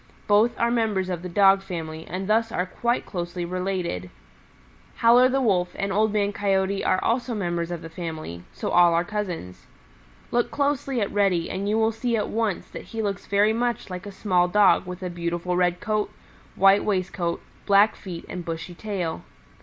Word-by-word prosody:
Both 215 Hz, +3 st, +3 dB
are 235 Hz, 0 st, +2 dB
members 215 Hz, -6 st, 0 dB
of 175 Hz, -2 st, -3 dB
the 180 Hz, -, -6 dB
Dog 195 Hz, +1 st, +5 dB
family 160 Hz, -4 st, -6 dB
and 185 Hz, +2 st, -4 dB
thus 225 Hz, +1 st, +2 dB
are 180 Hz, -, -1 dB
quite 235 Hz, +6 st, -1 dB
closely 175 Hz, -1 st, -4 dB
related. 180 Hz, -, -3 dB, 0.9 s
Howler 245 Hz, +2 st, +6 dB
the 270 Hz, +1 st, +1 dB
Wolf 180 Hz, -5 st, +1 dB
and 195 Hz, 0 st, -2 dB
Old 215 Hz, +2 st, +2 dB
Man 205 Hz, -1 st, 0 dB
Coyote 195 Hz, -1 st, 0 dB
are 185 Hz, -, +2 dB
also 240 Hz, 0 st, 0 dB
members 175 Hz, -4 st, -2 dB
of 175 Hz, -2 st, -5 dB
the -, -, -6 dB
family, 160 Hz, -, -6 dB
so -, -, -4 dB
all 175 Hz, -1 st, +5 dB
are 170 Hz, -, +2 dB
cousins. 180 Hz, -, -5 dB, 0.6 s
Look 240 Hz, 0 st, +1 dB
closely 280 Hz, -3 st, 0 dB
at 200 Hz, -, -1 dB
Reddy 195 Hz, -5 st, +1 dB
and 195 Hz, +2 st, -2 dB
you 215 Hz, -, +2 dB
will 225 Hz, 0 st, +3 dB
see 230 Hz, +1 st, -1 dB
at 210 Hz, -, -2 dB
once 220 Hz, -4 st, -1 dB
that -, -, -8 dB
he 225 Hz, -1 st, -4 dB
looks 200 Hz, -2 st, -3 dB
very 205 Hz, +2 st, +3 dB
much 235 Hz, -3 st, -2 dB
like 180 Hz, +2 st, -6 dB
a -, -, -6 dB
small 185 Hz, -3 st, +1 dB
Dog 195 Hz, -1 st, +4 dB
with 180 Hz, +1 st, -7 dB
a 180 Hz, -, -2 dB
beautiful 175 Hz, +1 st, -2 dB
red 180 Hz, 0 st, +1 dB
coat, 215 Hz, -1 st, -1 dB, 0.4 s
white 195 Hz, +1 st, +5 dB
waistcoat, 185 Hz, -4 st, -1 dB, 0.3 s
black 205 Hz, +1 st, +5 dB
feet 175 Hz, -4 st, -8 dB
and 180 Hz, -, -6 dB
bushy 165 Hz, +1 st, -5 dB
tail. 180 Hz, -4 st, -4 dB
195 Hz, 185 wpm, -25 LUFS, 175-215 Hz, 0.9 s, Howler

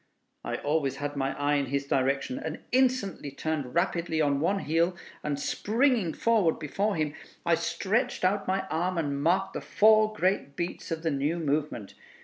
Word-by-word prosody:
I -, -, -3 dB
always 145 Hz, -2 st, 0 dB
had 145 Hz, +1 st, -4 dB
my 135 Hz, -1 st, -1 dB
eye 145 Hz, 0 st, +2 dB
in 140 Hz, -1 st, -1 dB
his 140 Hz, +2 st, -1 dB
direction, 140 Hz, -, 0 dB
and -, -, -5 dB
instantly 250 Hz, -, +1 dB
turned 145 Hz, -2 st, -3 dB
rapidly 170 Hz, -2 st, 0 dB
on 145 Hz, -2 st, +2 dB
one 180 Hz, +7 st, +1 dB
heel, 165 Hz, +4 st, +1 dB, 0.3 s
and 145 Hz, -1 st, -2 dB
springing 225 Hz, -, +1 dB
forward 215 Hz, -8 st, +2 dB
before 195 Hz, +7 st, -1 dB
him, 155 Hz, -2 st, -1 dB, 0.3 s
I 170 Hz, -, +3 dB
stretched 200 Hz, +7 st, 0 dB
out 195 Hz, +1 st, +1 dB
my 190 Hz, 0 st, 0 dB
arm 175 Hz, +3 st, 0 dB
and 140 Hz, -3 st, -1 dB
marked 190 Hz, +5 st, +2 dB
the -, -, -4 dB
four 215 Hz, 0 st, +4 dB
great 185 Hz, -8 st, 0 dB
beats 170 Hz, +3 st, -4 dB
of 165 Hz, -1 st, -3 dB
the 165 Hz, -, +1 dB
new 145 Hz, +4 st, 0 dB
movement. 150 Hz, -9 st, -2 dB
165 Hz, 170 wpm, -28 LUFS, 145-195 Hz, 0.3 s, four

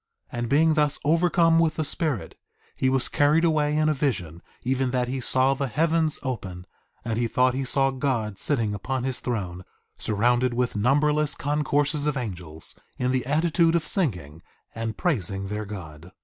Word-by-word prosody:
1:8 120 Hz, -, -3 dB
And 120 Hz, -1 st, -2 dB
being 155 Hz, +4 st, +4 dB
thus 150 Hz, -1 st, +2 dB
overcome 165 Hz, +1 st, +4 dB
with 165 Hz, -2 st, +2 dB
the 155 Hz, -, -1 dB
Spirit, 140 Hz, -, -2 dB, 0.4 s
he 130 Hz, -, +1 dB
was 130 Hz, -1 st, +1 dB
carried 150 Hz, +3 st, +3 dB
away 150 Hz, -2 st, +2 dB
in 155 Hz, 0 st, +2 dB
a 155 Hz, -, +3 dB
vision, 90 Hz, -, -2 dB, 0.2 s
even 130 Hz, +1 st, 0 dB
that 125 Hz, -1 st, 0 dB
he 130 Hz, +2 st, -3 dB
saw 130 Hz, +3 st, +2 dB
the 135 Hz, 0 st, -2 dB
heavens 160 Hz, +3 st, +1 dB
open, 95 Hz, -9 st, -5 dB, 0.4 s
and 115 Hz, -1 st, -1 dB
he 120 Hz, -, +1 dB
thought 125 Hz, +2 st, +2 dB
he 135 Hz, +1 st, -2 dB
saw 135 Hz, +1 st, +2 dB
God 125 Hz, -7 st, -2 dB
sitting 115 Hz, -8 st, +1 dB
upon 125 Hz, +6 st, -3 dB
his 130 Hz, -1 st, -2 dB
throne, 95 Hz, -7 st, -4 dB, 0.4 s
surrounded 120 Hz, +3 st, +1 dB
with 125 Hz, -1 st, 0 dB
numberless 145 Hz, +7 st, +2 dB
concourses 145 Hz, 0 st, 0 dB
of 150 Hz, -2 st, 0 dB
angels 90 Hz, -9 st, -6 dB, 0.2 s
in 125 Hz, 0 st, 0 dB
the 130 Hz, -1 st, -1 dB
attitude 165 Hz, +3 st, +2 dB
of 165 Hz, -3 st, 0 dB
singing 90 Hz, -, -2 dB, 0.3 s
and 115 Hz, -1 st, -4 dB
praising 100 Hz, -, -1 dB
their 105 Hz, +1 st, -3 dB
God. 85 Hz, -4 st, -9 dB
130 Hz, 175 wpm, -25 LUFS, 110-150 Hz, 0.4 s, being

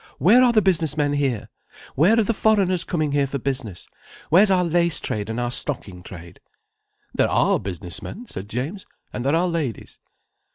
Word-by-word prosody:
"Where 210 Hz, -, +5 dB
are 250 Hz, -1 st, +5 dB
the 215 Hz, -3 st, +3 dB
business 165 Hz, -6 st, +1 dB
men 145 Hz, -1 st, +1 dB
here? 135 Hz, -7 st, -1 dB, 0.5 s
Where 185 Hz, -, +4 dB
are -, -, +4 dB
the 230 Hz, -, 0 dB
foreigners 195 Hz, -5 st, +2 dB
coming 155 Hz, -5 st, -1 dB
here 140 Hz, -1 st, +1 dB
for 140 Hz, -, -3 dB
business, 130 Hz, -9 st, -4 dB, 0.4 s
where's 195 Hz, +6 st, +6 dB
our 185 Hz, -2 st, +3 dB
lace 170 Hz, -1 st, +1 dB
trade 105 Hz, 0 st, -4 dB
and 115 Hz, +2 st, -3 dB
our 120 Hz, 0 st, -2 dB
stocking 105 Hz, -10 st, -4 dB
trade?" 85 Hz, -1 st, -12 dB, 0.7 s
"There -, -, +2 dB
are -, -, +2 dB
business 90 Hz, -2 st, -6 dB
men," 240 Hz, -, -8 dB
said 100 Hz, -, -8 dB
James. 145 Hz, -, -5 dB, 0.3 s
"And 120 Hz, -, -4 dB
there 140 Hz, +4 st, +2 dB
are 175 Hz, +2 st, +2 dB
ladies." 160 Hz, -, -4 dB
145 Hz, 180 wpm, -22 LUFS, 120-185 Hz, 0.7 s, where's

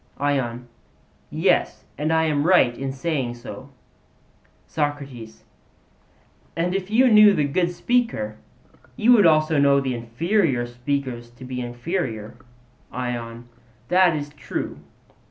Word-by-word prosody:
ION: 125 Hz, -4 st, -2 dB, 0.6 s
Yes; -, -, 0 dB
and 150 Hz, +3 st, -2 dB
I 160 Hz, 0 st, +3 dB
am 150 Hz, -3 st, +1 dB
right 135 Hz, -10 st, +4 dB
in 135 Hz, +2 st, -4 dB
saying 135 Hz, -3 st, -2 dB
so. 130 Hz, +3 st, -10 dB, 1.0 s
SOCRATES: 140 Hz, -7 st, -5 dB, 1.1 s
And 175 Hz, +2 st, -1 dB
if 195 Hz, 0 st, -3 dB
you 245 Hz, +5 st, +4 dB
knew 210 Hz, -1 st, +7 dB
the 150 Hz, -, +1 dB
good 170 Hz, +5 st, 0 dB
speaker, 175 Hz, -, -1 dB, 0.6 s
you 230 Hz, +3 st, +3 dB
would 210 Hz, -7 st, +7 dB
also 155 Hz, -1 st, +3 dB
know 140 Hz, 0 st, +4 dB
the 135 Hz, -2 st, -2 dB
inferior 125 Hz, -, 0 dB
speakers 120 Hz, -1 st, -4 dB
to 120 Hz, +2 st, -13 dB
be 125 Hz, 0 st, -5 dB
inferior? 120 Hz, -, -4 dB, 0.6 s
ION: 120 Hz, -1 st, -5 dB, 0.4 s
That 180 Hz, -2 st, +4 dB
is 145 Hz, -1 st, -4 dB
true. 145 Hz, -1 st, -6 dB
140 Hz, 120 wpm, -23 LUFS, 120-170 Hz, 1.1 s, knew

